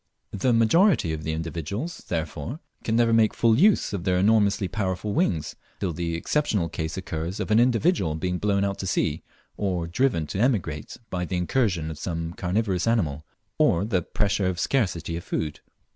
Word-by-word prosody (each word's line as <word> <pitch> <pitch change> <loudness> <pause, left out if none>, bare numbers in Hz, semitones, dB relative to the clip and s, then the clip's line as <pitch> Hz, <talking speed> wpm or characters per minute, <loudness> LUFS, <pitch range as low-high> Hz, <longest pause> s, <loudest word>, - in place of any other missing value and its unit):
The 110 +6 +1
majority 115 - +4
of 80 0 -5
the 80 - -2
individuals, 80 - -4
therefore, 80 - -3 0.2
can 110 - 0
never 115 -1 +3
make 110 -1 +4
full 115 0 +3
use 200 - +4
of 95 -4 -3
their 90 0 +2
enormously 100 0 +3
powerful 100 0 -2
wings, 80 -6 0 0.2
till 90 -4 -1
the 85 0 -2
exceptional 100 - 0
case 80 +2 -4
occurs 85 0 -4
of - - -3
an 110 - +5
individual 120 - +2
being 90 +3 -2
blown 100 -1 +1
out 100 0 -2
to 95 - -3
sea, - - 0 0.4
or 90 -4 -1
driven 85 -2 +1
to 85 +6 -4
emigrate 95 - 0
by 90 -1 -2
the 90 +1 -2
incursion 90 -4 0
of 80 - -8
some 85 -1 -3
carnivorous 95 +1 -1
animal, 80 -11 +1 0.4
or 85 +4 +3
the 100 -5 +1
pressure 100 +2 0
of 90 -2 -2
scarcity 90 - 0
of 85 - -7
food. 75 -2 -3
95 Hz, 175 wpm, -25 LUFS, 85-110 Hz, 0.4 s, an